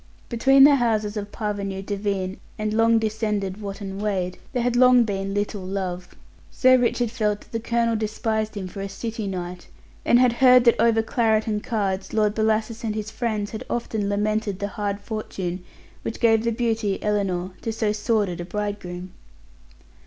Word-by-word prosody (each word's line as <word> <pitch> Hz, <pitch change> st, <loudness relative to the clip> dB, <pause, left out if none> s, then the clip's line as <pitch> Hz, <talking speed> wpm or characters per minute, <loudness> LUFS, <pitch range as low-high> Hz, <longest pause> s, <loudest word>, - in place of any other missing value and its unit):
Between 270 Hz, +3 st, +5 dB
the 285 Hz, 0 st, +7 dB
houses 215 Hz, -4 st, 0 dB
of 205 Hz, -1 st, -5 dB
parvenu 200 Hz, -3 st, -3 dB
Devine 195 Hz, -2 st, -2 dB, 0.2 s
and 215 Hz, -1 st, -2 dB
long 225 Hz, +1 st, +4 dB
descended 215 Hz, -3 st, -2 dB
Wotton 195 Hz, -1 st, -6 dB
Wade 185 Hz, -3 st, -2 dB
there 250 Hz, -3 st, -1 dB
had 245 Hz, 0 st, +1 dB
long 250 Hz, 0 st, +6 dB
been 195 Hz, -2 st, -3 dB
little 205 Hz, 0 st, -2 dB
love. 185 Hz, -1 st, -4 dB, 0.3 s
Sir 255 Hz, 0 st, +5 dB
Richard 245 Hz, -2 st, +1 dB
felt 210 Hz, -3 st, -1 dB
that -, -, -19 dB
the 230 Hz, -, -2 dB
colonel 230 Hz, 0 st, +1 dB
despised 215 Hz, 0 st, -2 dB
him 190 Hz, -2 st, -4 dB
for 195 Hz, +2 st, -7 dB
a 195 Hz, -, -4 dB
city 220 Hz, +1 st, -4 dB
knight, 180 Hz, -1 st, -5 dB, 0.4 s
and 240 Hz, -, +5 dB
had 250 Hz, -1 st, +4 dB
heard 250 Hz, 0 st, +6 dB
that 235 Hz, -2 st, +4 dB
over 230 Hz, -1 st, +4 dB
claret 220 Hz, -2 st, +1 dB
and 210 Hz, -2 st, -2 dB
cards 195 Hz, -4 st, -2 dB
Lord 210 Hz, -1 st, +2 dB
Bellasis 220 Hz, +1 st, 0 dB
and 215 Hz, -2 st, -2 dB
his 215 Hz, 0 st, -4 dB
friends 220 Hz, -3 st, -2 dB
had 220 Hz, -, -5 dB
often 220 Hz, -4 st, -2 dB
lamented 210 Hz, 0 st, 0 dB
the 200 Hz, 0 st, -3 dB
hard 205 Hz, -1 st, -3 dB
fortune 190 Hz, -4 st, -4 dB, 0.4 s
which 225 Hz, -, -5 dB
gave 225 Hz, -1 st, +4 dB
the 235 Hz, -, +1 dB
beauty, 225 Hz, -3 st, 0 dB
Ellinor, 195 Hz, -3 st, 0 dB
to 225 Hz, -, -2 dB
so 220 Hz, -1 st, 0 dB
sordid 210 Hz, -4 st, 0 dB
a -, -, -3 dB
bridegroom. 185 Hz, -3 st, -5 dB
215 Hz, 175 wpm, -24 LUFS, 200-230 Hz, 0.4 s, the